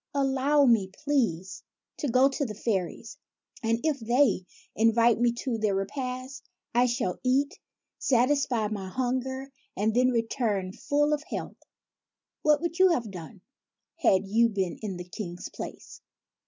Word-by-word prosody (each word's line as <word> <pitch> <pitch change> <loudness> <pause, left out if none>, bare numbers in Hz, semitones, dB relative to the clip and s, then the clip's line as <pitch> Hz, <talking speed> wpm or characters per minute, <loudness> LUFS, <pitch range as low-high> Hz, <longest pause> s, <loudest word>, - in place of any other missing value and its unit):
Allow 275 +1 +3
me, 225 -6 +4
please, 200 - -1 0.4
to 290 - -2
go 255 +2 +5
to 275 +1 -2
the 215 -6 -4
fairies; 215 - -3 0.4
and, 230 -1 +1
if 310 -3 +1
they 230 -5 +2 0.3
invite 230 +1 +4
me 240 0 +3
to 240 -5 -1
their 210 -2 +1
repast, 255 +6 -4 0.2
I 245 +1 +4
shall 240 -6 -1
eat, 275 +7 +1 0.4
satisfy 250 -3 +2
my 200 -3 -4
hunger, 260 +3 -2 0.3
and 215 +3 +1
then 250 +2 +4
return, 225 -5 -1
full 295 +5 +1
of 295 - 0
health." - - -6 0.8
What 300 -1 +3
would 340 +1 -3
you 375 0 +7
have 240 - 0
done, 180 +2 -10 0.6
had 200 - +3
you 230 +4 +3
been 190 -5 -2
in 200 -4 -4
the 180 0 -8
King's 180 -2 -6
place - - -9
240 Hz, 145 wpm, -27 LUFS, 205-270 Hz, 0.8 s, you